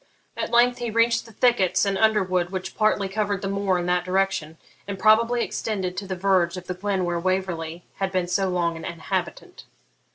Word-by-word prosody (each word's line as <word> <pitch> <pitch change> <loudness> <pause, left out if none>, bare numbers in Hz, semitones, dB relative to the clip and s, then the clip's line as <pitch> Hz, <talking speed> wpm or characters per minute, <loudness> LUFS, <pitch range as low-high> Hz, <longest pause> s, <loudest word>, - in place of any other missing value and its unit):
At - - -3
length 245 +1 +3
he 240 -1 -2
reached 230 +1 +2
the - - -13
thickets 205 -5 +2
and 200 -1 0
underwood 190 -5 +2
which 190 0 -5
partly 215 -2 +2
covered 205 0 -2
the - - -1
moor 195 -1 0
in 175 - -2
that 180 0 +1
direction, 185 -4 -1 0.3
and 200 -1 -4
probably 230 +3 +4
extended 190 -4 -3
to 200 - -4
the 190 - -3
verge 185 -1 +1
of 180 - -8
the 180 - -3
glen 190 0 -1
where 175 -1 -1
Waverley 175 -2 -2
had 195 -1 -1
been 185 -2 0
so 190 +2 0
long 170 -2 0
an - - -9
inhabitant. 170 -1 -4
190 Hz, 195 wpm, -24 LUFS, 180-210 Hz, 0.3 s, probably